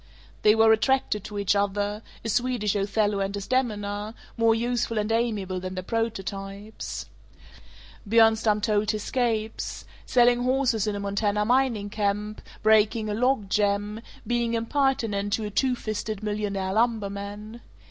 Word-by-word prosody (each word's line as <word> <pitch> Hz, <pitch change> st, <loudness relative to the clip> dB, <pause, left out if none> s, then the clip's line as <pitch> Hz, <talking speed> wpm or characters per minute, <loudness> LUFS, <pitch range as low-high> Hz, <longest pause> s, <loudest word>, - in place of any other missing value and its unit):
They 210 Hz, 0 st, +5 dB
were 220 Hz, 0 st, +6 dB
attracted 220 Hz, -2 st, +1 dB
to 210 Hz, -, -6 dB
each 200 Hz, 0 st, +2 dB
other; 205 Hz, +1 st, 0 dB, 0.2 s
a -, -, -1 dB
Swedish 240 Hz, -3 st, 0 dB
Othello 205 Hz, 0 st, +1 dB
and 195 Hz, 0 st, -1 dB
Desdemona, 210 Hz, -1 st, -2 dB, 0.2 s
more 230 Hz, -1 st, +3 dB
useful 235 Hz, -1 st, -1 dB
and 210 Hz, +1 st, 0 dB
amiable 215 Hz, -5 st, 0 dB
than 185 Hz, +1 st, -6 dB
their 185 Hz, -, -4 dB
prototypes. 205 Hz, -1 st, -4 dB, 1.0 s
Bjornstam 220 Hz, -1 st, +4 dB
told 210 Hz, 0 st, +1 dB
his 215 Hz, -2 st, -1 dB
scapes: 225 Hz, -4 st, -2 dB, 0.2 s
selling 245 Hz, 0 st, +4 dB
horses 250 Hz, -4 st, +1 dB
in 210 Hz, -, -1 dB
a -, -, -3 dB
Montana 205 Hz, +1 st, 0 dB
mining 240 Hz, -4 st, +1 dB
camp, 210 Hz, 0 st, -2 dB, 0.2 s
breaking 220 Hz, 0 st, +3 dB
a -, -, -1 dB
log 245 Hz, -1 st, +1 dB
jam, 205 Hz, +1 st, 0 dB, 0.2 s
being 235 Hz, -1 st, 0 dB
impertinent 230 Hz, -5 st, 0 dB
to 220 Hz, -, 0 dB
a 210 Hz, -, -5 dB
"two 255 Hz, +4 st, +1 dB
fisted" 215 Hz, -2 st, -4 dB
millionaire 205 Hz, -2 st, -2 dB
lumberman. 210 Hz, 0 st, -2 dB
215 Hz, 135 wpm, -26 LUFS, 205-230 Hz, 1.0 s, were